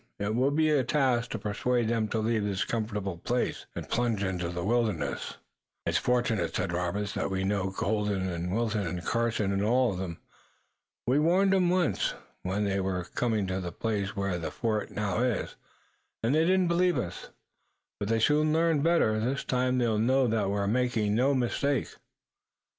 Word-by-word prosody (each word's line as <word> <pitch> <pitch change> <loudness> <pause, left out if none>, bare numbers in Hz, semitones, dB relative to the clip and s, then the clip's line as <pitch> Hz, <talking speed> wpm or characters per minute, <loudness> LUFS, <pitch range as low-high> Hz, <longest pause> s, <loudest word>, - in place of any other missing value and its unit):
It 105 +1 -2
will 130 +4 +2
be 155 +2 +2
a 145 -3 +3
task 125 -4 +1
to - - -3
persuade 110 +3 0
them 115 -1 +1
to 110 - -2
leave 110 0 +1
this 100 -1 -1
comfortable 105 -5 -3
place 120 +7 -2
and - - -5
plunge 115 -4 0
into 90 -3 -2
the 85 0 -4
wilderness." 110 -4 -1 0.5
"It's - - +2
fortunate," 120 -8 0
said 85 - -1
Robert, 90 +4 -1
"that - - -2
we 95 -1 -1
know 95 -1 0
Colden 100 -1 -1
and 90 0 -3
Wilton 110 -2 0
and 85 0 -4
Carson 115 -4 0
and 100 0 0
all 125 +2 +3
of 90 - -5
them. 85 -3 -4 0.9
We 130 +5 +3
warned 185 +5 +3
'em 185 -2 +3
once 180 -2 +1 0.3
when 95 +3 -1
they 100 -1 0
were 95 -1 -1
coming 110 -4 0
to 95 0 -2
the 90 -1 -4
place 105 -1 -2
where 100 -3 -1
the 80 - -3
fort 110 -3 -2
now 105 0 -2
is, 125 -5 -1 0.7
and 115 +4 +2
they 160 +2 +4
didn't 185 0 +3
believe 175 +1 +2
us, 85 - -4 0.7
but 100 - -3
they 115 0 +2
soon 150 +6 +3
learned 165 -1 +2
better. 165 -10 +3
This 130 +5 -1
time 125 0 +1
they'll 115 -4 +1
know 130 +4 +3
that 110 -4 +1
we're 100 0 0
making 115 -1 +1
no 130 +5 +3
mistake." 135 +2 0
110 Hz, 180 wpm, -29 LUFS, 100-125 Hz, 0.9 s, they